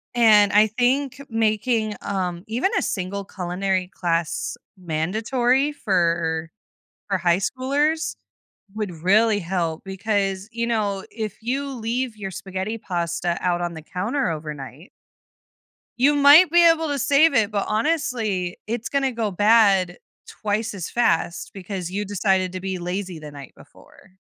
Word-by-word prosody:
And 215 -3 +6
I 210 +1 +5
think 255 +4 0
making, 220 -1 0
um, 180 -3 -3
even 245 - 0
a - - +2
single 195 +1 -3
culinary 185 0 -2
class 170 -2 -2 0.2
mandatory 225 - 0
for 170 - 0 0.6
for 195 -2 +1
high 175 -1 +2
schoolers 285 - 0 0.6
would 215 -3 -3
really 205 +6 +3
help 170 -3 -2
because, 195 0 -2
you 235 +1 -2
know, 205 -4 -1
if 215 -2 -5
you 270 +5 -2
leave 240 -1 -3
your 195 -2 -5
spaghetti 190 +4 -4
pasta 175 -2 -2
out 175 -1 0
on 175 -1 -3
the 160 - -8
counter 220 - -2
overnight 150 0 -7 1.1
you 280 +4 +4
might 290 +5 +8
be 345 0 +6
able 325 -1 +2
to 285 -1 -2
save 285 +4 +4
it, 225 -4 +2
but 205 -1 -1
honestly, 220 - -1
it's 230 +1 -3
gonna 275 -1 +1
go 225 -3 -2
bad 200 -3 +4 0.3
twice 215 +1 -2
as 185 -5 -5
fast 170 -7 0
because 185 -2 -6
you 205 +2 -2
decided 190 -2 +1
to 185 - -4
be 190 0 -3
lazy 180 0 -4
the 150 -1 -9
night 140 -3 -11
before. 190 - -19
205 Hz, 140 wpm, -23 LUFS, 180-235 Hz, 1.1 s, might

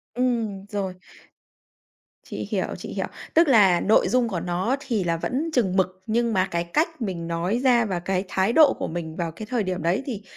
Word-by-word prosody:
Ừm, 230 -6 -1
rồi. 195 -2 -2 1.3
Chị - - -6
hiểu, - - 0
chị - - -8
hiểu. - - -2 0.3
Tức 330 +1 +5
là 200 -9 +5
nội 215 - +4
dung 250 -1 +2
của 190 -6 -2
nó 180 +9 -1
thì 235 -8 -2
là 170 -1 0
vẫn 275 - -2
chừng 200 -9 +1
mực, 185 -1 0
nhưng 230 +1 +1
mà 185 -2 +2
cái 170 0 0
cách 310 - -1
mình 180 -6 -3
nói 170 +7 -1
ra 240 -3 +4
và 185 -4 -2
cái 185 +2 -2
thái 190 +4 +1
độ 310 0 +6
của - - -4
mình 160 -1 -5
vào 170 -1 -3
cái 215 +7 -8
thời 240 -4 0
điểm 185 -2 -3
đấy 175 +10 +1
thì 220 -7 -5
195 Hz, 210 wpm, -24 LUFS, 180-240 Hz, 1.3 s, độ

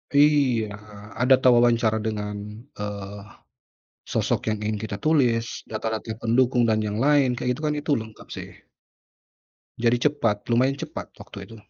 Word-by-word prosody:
Iya 140 -6 +4 0.5
a - - +4
data 130 -1 +5
wawancara 115 -2 +3
dengan, 105 -1 -3 0.4
eee, 100 -1 -6 0.9
sosok - - +1
yang 110 - -3
ingin 105 0 -2
kita 100 -2 -4
tulis, 125 -7 +1
data-data 110 0 -4
pendukung 120 +1 +2
dan 110 -1 +2
yang 105 +1 -2
lain 140 -1 +4
kayak 125 0 -1
gitu - - -9
kan 150 0 +1
itu 145 - -1
lengkap 110 -1 -9
sih. - - -7 1.3
Jadi 120 +4 +3
cepat, 115 -8 -1
lumayan 125 +3 +3
cepat 155 +3 -7
waktu - - -12
itu. 115 - -13
115 Hz, 145 wpm, -24 LUFS, 110-130 Hz, 1.3 s, data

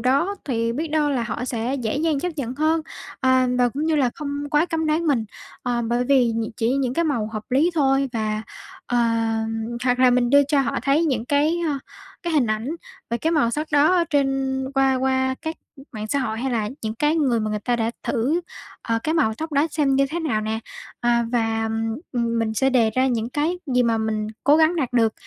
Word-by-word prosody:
đó 280 - +1
thì 230 -4 -1
biết 310 +7 -3
đâu 300 -1 +1
là 260 -4 0
họ 235 +1 -3
sẽ 240 +1 -2
dễ 245 -3 -2
dàng 305 -1 0
chấp 360 - -1
nhận 255 -4 -3
hơn, 310 +3 +1 0.4
à, 260 -1 +3
và 245 -1 +4
cũng 285 +6 -3
như 320 -1 +2
là 265 -4 +2
không 285 -1 -4
quá 300 +3 +3
cấm 325 -2 -1
đoán 315 +2 +1
mình, 255 -7 +2 0.4
ờ, 240 -1 -1
bởi 240 +2 0
vì 250 -3 +3
nh 225 -1 -2
chỉ 225 +1 +1
những 260 -2 -1
cái 335 +2 +1
màu 235 -8 0
hợp 215 -1 -5
lý 285 +7 +3
thôi. 270 -3 +2
Và, 215 -2 -2 0.4
ờ, 245 - -1 0.9
hoặc 250 -1 +2
là 255 0 +6
mình 245 0 +2
đưa 285 0 +7
cho 285 -1 +3
họ 260 - -1
thấy 285 +4 +2
những 255 -7 0
cái, 295 +5 +2
ơ, 285 -3 -1 0.4
cái 345 -2 -2
hình 290 -6 +3
ảnh 215 +4 -2 0.4
và 235 - +1
cái 320 +6 -1
màu 295 -8 +2
sắc 300 +5 -2
đó 295 +4 +5
ở 345 - +3
trên 270 -2 +1
qua 270 -1 +3
qua 260 0 +1
các 320 +1 -4 0.4
mạng 215 -1 -5
xã 280 - +1
hội, 220 -4 -2
hay 265 +3 -2
là 215 -3 0
những 220 -1 -3
cái 295 +7 +1
người 255 -7 +2
mà 215 - -2
người 210 - -1
ta 240 +3 -1
đã 230 0 0
thử, 280 +8 0 0.4
ờ, 230 0 0
cái 315 - 0
màu 255 -10 +2
tóc 315 +6 -6
đó 290 +2 +3
xem 290 -3 +1
như 275 0 +3
thế 340 +2 -2
nào 255 -10 0
nè. 220 +1 -2 0.4
À 235 -1 +2
và, 225 -2 0 0.4
ừm, 235 -2 0
mình 220 -1 -1
sẽ 265 +4 +2
đề 235 -4 +3
ra 255 +4 +1
những 235 -2 -1
cái 315 +6 -1
gì 250 -2 +2
mà 230 -2 +1
mình 215 -1 -1 0.2
cố 290 +1 +6
gắng 320 +2 +3
đạt 265 -7 -1
được 225 -3 +3
260 Hz, 230 wpm, -23 LUFS, 230-295 Hz, 0.9 s, đưa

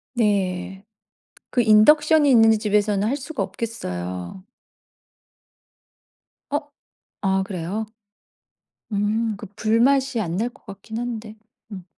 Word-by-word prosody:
네. 195 -3 -1 0.7
그 245 - +2
인덕션이 295 +7 +5
있는 225 -2 +6
집에서는 210 -1 +1
할 270 +5 0
수가 295 +2 -4
없겠어요. 90 - -5 2.1
어? 290 - +1 0.6
아 190 -1 +1
그래요? 190 +3 -4 1.1
음 210 +2 0
그 - - -9
불맛이 245 +3 +2
안 175 -3 -2
날 230 +4 0
것 275 - -24
같긴 200 +3 -8
한데. 225 -3 -5 0.4
음. 185 -2 -8
215 Hz, 185 characters per minute, -22 LUFS, 195-235 Hz, 2.1 s, 있는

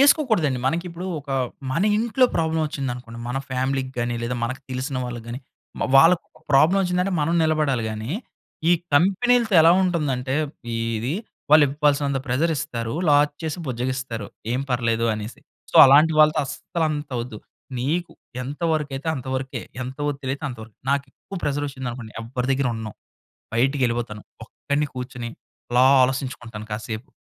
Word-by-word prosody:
యేసుకోకూడదండి. 220 - +4
మనకి 165 +6 0
ఇప్పుడు 175 +2 -6
ఒక 140 0 -11 0.4
మన 165 - +1 0.2
ఇంట్లో 235 +3 +3
ప్రాబ్లమ్ 160 -1 +1
వచ్చిందనుకోండి, 125 -5 -5
మన 125 - -2
ఫ్యామిలీకి 130 +1 -1
గాని, 120 0 0
లేదా 120 +1 -2
మనకు 130 +3 -4
తెలిసిన 130 +2 -3
వాళ్ళకి 120 -2 -6
గాని, 120 +3 -5 0.4
మ - - -7 0.2
వాళ్ళకి 165 +5 +6 0.3
ప్రాబ్లమ్ 160 +8 +5
వచ్చిందంటే 180 +1 0
మనం 165 +3 +1
నిలబడాలి 155 -6 +1
గానీ, 110 +3 -5 0.6
ఈ - - +7 0.2
కంపెనీలతో 220 +7 +3
ఎలా 165 - +7
ఉంటుందంటే, 140 -7 -1 0.4
ఇది 115 +4 -1 0.4
వాళ్ళు 155 0 +8
ఇవ్వాల్సినంత 140 -1 +1
ప్రెషర్ 140 +7 +1
ఇస్తారు. 115 -7 -3 0.2
లాస్ 145 0 +4
చేసి 160 +1 -3
బుజ్జగిస్తారు. 125 -3 -3 0.3
ఏం 125 - 0
పర్లేదు 115 -2 +1
అనేసి. 110 +2 -7 0.3
సో, - - 0
అలాంటి 150 +4 +6
వాళ్ళతో 155 0 +5
అస్సలు 160 +4 -3
అంత 145 -1 -4
వద్దు. 115 -3 -8 0.4
నీకు 160 +8 -1 0.3
ఎంతవరకైతే 150 0 -2
అంతవరకే, 130 -1 -4 0.2
ఎంత 130 +1 -6
వదిలతే 140 0 -3
అంతవరకే, 110 -4 -10
నాకు 140 0 +1
ఎక్కువ 195 - -10
ప్రెషర్ 145 0 0
వచ్చిందనుకోండి 125 -4 -6
ఎవ్వరి 125 +2 -3
దగ్గర 135 -1 +1
ఉండను. 110 -2 -5 0.6
బయటికేళ్ళిపోతాను. 120 -4 0 0.2
ఒక్కడిని 145 +5 -2
కూర్చొని, 125 -2 -5 0.4
అలా 125 +1 +5 0.2
ఆలోచించుకుంటాను 120 -4 -2
కాసేపు. 110 +4 -5
135 Hz, 140 wpm, -23 LUFS, 120-155 Hz, 0.6 s, వాళ్ళు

